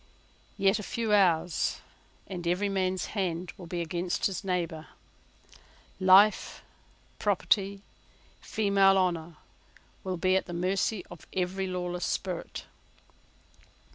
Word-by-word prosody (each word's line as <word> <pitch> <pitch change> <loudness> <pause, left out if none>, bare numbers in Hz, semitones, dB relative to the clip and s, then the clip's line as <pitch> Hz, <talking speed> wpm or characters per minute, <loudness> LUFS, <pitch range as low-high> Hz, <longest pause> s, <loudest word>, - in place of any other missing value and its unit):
Yet 195 +2 +3
a 210 - -7
few 225 -2 -1
hours, 175 -4 +2 0.5
and 175 -3 -6
every 185 +4 +1
man's 185 -1 0
hand 180 -3 -2
will 180 -4 -10
be 175 0 -3
against 175 +2 -2
his 195 0 -1
neighbour. 170 -4 -2 1.1
Life, 190 +3 +5 0.6
property, 195 0 +1 0.6
female 200 -2 +3
honour, 170 -3 -1 0.7
will 185 -1 -3
be 185 +2 +2
at 190 - 0
the 175 - -6
mercy 185 +3 0
of 175 - -12
every 190 +1 -1
lawless 180 -1 -3
spirit. 180 -3 -4
185 Hz, 110 wpm, -29 LUFS, 175-195 Hz, 1.1 s, Life